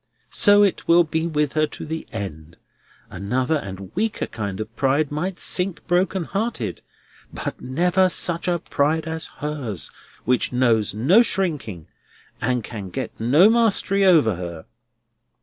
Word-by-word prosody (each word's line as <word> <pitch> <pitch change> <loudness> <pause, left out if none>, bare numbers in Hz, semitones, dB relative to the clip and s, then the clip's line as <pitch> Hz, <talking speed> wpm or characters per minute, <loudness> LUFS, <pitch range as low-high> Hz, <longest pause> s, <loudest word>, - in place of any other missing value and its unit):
So 205 0 +5
it 200 - 0
will 170 +1 +6
be 160 +1 -2
with 150 -3 0
her 155 0 +2
to - - -8
the 160 +1 -5
end. 85 -7 -7 0.5
Another 125 - -1
and 95 -6 -8
weaker 215 +3 -1
kind 100 -4 -5
of 110 +2 -6
pride 140 +3 +1
might 175 +5 -3
sink 180 -1 0
broken 185 +1 +1
hearted, 195 - -3 0.5
but - - -6
never 180 +8 +2
such 170 0 0
a 175 -1 +2
pride 160 -1 0
as 160 0 -4
hers: 140 - -5 0.3
which 125 0 +1
knows 115 -5 +2
no 165 - +5
shrinking, 150 - -2 0.6
and 125 -1 0
can 105 -5 -7
get - - -4
no 140 - +5
mastery 220 -3 +2
over 155 - +4
her." 85 -3 -7
150 Hz, 145 wpm, -22 LUFS, 110-180 Hz, 0.6 s, will